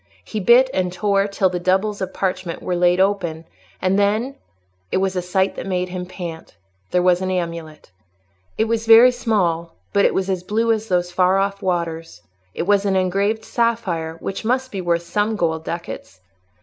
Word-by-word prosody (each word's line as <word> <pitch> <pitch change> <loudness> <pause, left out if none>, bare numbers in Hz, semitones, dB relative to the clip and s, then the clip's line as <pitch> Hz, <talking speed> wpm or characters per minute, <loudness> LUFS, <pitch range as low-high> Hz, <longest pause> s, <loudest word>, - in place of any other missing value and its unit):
He 215 - -4
bit 240 +6 +6
and 180 -1 0
tore 195 +2 +1
till 200 -1 +1
the 180 - -2
doubles 190 +3 0
of 190 - -3
parchment 185 -3 -3
were 180 - -1
laid 175 +1 +3
open, 180 -5 0 0.3
and 190 +2 +1
then—it 95 - -3
was 190 0 0
a 180 - 0
sight 190 +2 0
that - - -6
made 180 -1 -1
him 180 0 -5
pant—there 160 - -6
was 180 0 +3
an 185 - -1
amulet. 170 - -4 0.7
It - - +3
was 225 0 -1
very 230 +3 +8
small, 180 -9 -1 0.2
but 200 -1 +3
it - - +2
was 190 0 0
as 190 -2 -1
blue 225 +5 0
as 220 0 -1
those 180 -2 0
far 185 +1 +3
off 200 +1 -1
waters; 165 - -3 0.3
it - - -1
was 200 +2 +3
an 195 -2 +1
engraved 195 +4 0
sapphire, 195 -9 -1
which 195 - -4
must 255 +3 0
be 195 - -4
worth 170 -1 0
some 210 +4 -1
gold 160 -4 -1
ducats. 165 - -7
185 Hz, 180 wpm, -21 LUFS, 170-205 Hz, 0.7 s, very